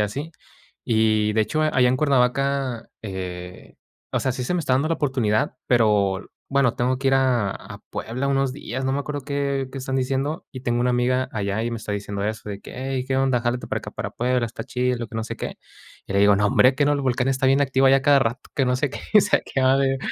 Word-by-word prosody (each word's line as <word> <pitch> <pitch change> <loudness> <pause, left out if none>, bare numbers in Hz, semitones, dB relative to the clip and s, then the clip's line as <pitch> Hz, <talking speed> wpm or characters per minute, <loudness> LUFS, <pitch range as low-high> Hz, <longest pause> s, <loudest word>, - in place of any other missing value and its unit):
así. 140 +10 -3 0.5
Y 110 -1 +2
de 110 - +2
hecho, 155 +8 0
allá 130 -5 +3
en 130 - +2
Cuernavaca, 135 -2 +1
eh, 90 -3 -7 0.4
o - - +1
sea, 130 - 0
sí 125 0 -4
se 150 - -1
me 180 - +1
está 130 -4 +1
dando 140 +4 +1
la 165 - +1
oportunidad, 130 -3 0
pero, 105 -5 +2 0.2
bueno, 135 -3 +2
tengo 125 +1 0
que 135 - +1
ir 135 - +4
a 125 -6 +2
a - - -9
Puebla 130 +5 -3
unos 135 -1 +1
días, 130 -2 -5
no 135 - 0
me 140 - 0
acuerdo 145 0 -5
qué 140 -1 -1
qué 135 - -5
están 135 0 -3
diciendo, 135 +4 -1
y 130 - -7
tengo 120 -1 -1
una 125 0 +2
amiga 125 +1 +1
allá, 100 +1 -2
y 120 - -2
me 115 - -4
está 105 - -7
diciendo 100 0 -4
eso 110 0 -3
de 100 0 -6
que: - - -11 0.2
"Ey, 130 -1 -2
qué 135 -1 0
onda, 135 -2 +2
jálate 120 +1 -2
para - - -2
acá, - - -8
para - - -5
Puebla, 125 0 0
está 115 - -6
chido, 125 0 -1
y - - -8
lo 120 - -5
que - - -14
no 110 - -2
sé - - -6
qué". - - -5 0.5
Y - - -5
le 100 - +2
digo: 100 0 +5
"Nombre, 105 +6 +4
¿qué 145 - +2
no 145 - +3
el 145 - 0
volcán 130 -1 0
está 130 0 +1
bien 135 +2 +4
activo, 135 0 +2
allá 135 +1 +6
a 135 - -1
cada 145 -1 +5
rato, 120 0 -2
que 135 -3 +1
no 125 - +2
sé 135 +1 -1
qué, - - -7
y 210 - +9
se - - +3
acaba 130 0 +1
de 135 -1 +1
130 Hz, 255 wpm, -23 LUFS, 115-135 Hz, 0.5 s, y